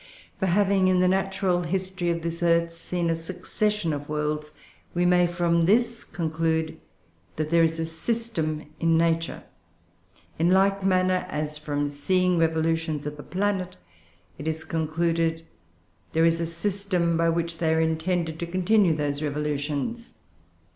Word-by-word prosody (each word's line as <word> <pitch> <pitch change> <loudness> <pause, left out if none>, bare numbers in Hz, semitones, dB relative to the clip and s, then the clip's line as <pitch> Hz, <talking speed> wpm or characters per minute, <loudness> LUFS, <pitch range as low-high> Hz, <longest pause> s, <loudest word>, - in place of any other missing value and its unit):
For 190 - +1
having, 195 +1 +3
in 185 -1 +3
the 185 - +4
natural 190 -1 +1
history 185 0 -2
of 170 -1 -1
this 170 0 -4
earth, 170 0 +2
seen 170 0 -2
a - - +1
succession 185 +2 -2
of 145 0 -5
worlds, 150 0 -2 0.4
we 175 +1 +2
may 180 0 +4
from 170 -1 +1
this 230 +6 +2
conclude 160 -1 -1 0.6
that 155 0 -3
there 170 0 +5
is 165 0 +2
a 165 - 0
system 160 -3 -2 0.2
in 165 -1 +3
Nature; 165 0 0 1.0
in 170 +2 +3
like 195 +1 +3
manner 185 -1 +2
as, 150 -2 -3
from 145 -1 -1
seeing 180 +5 +1
revolutions 160 -2 0
of 150 0 -4
the 145 - -9
planets, 185 +1 -2 0.6
it 150 - -5
is 160 0 -2
concluded, 165 +1 0
that 85 - -34
there 160 +1 +4
is 165 0 +2
a 165 - -1
system 180 -1 -1
by 165 0 +2
which 165 0 -2
they 160 -2 +2
are 160 - +2
intended 160 0 0
to 170 - -3
continue 185 0 +3
those 145 -1 -2
revolutions. 150 +9 -3
165 Hz, 155 wpm, -26 LUFS, 160-185 Hz, 1.0 s, there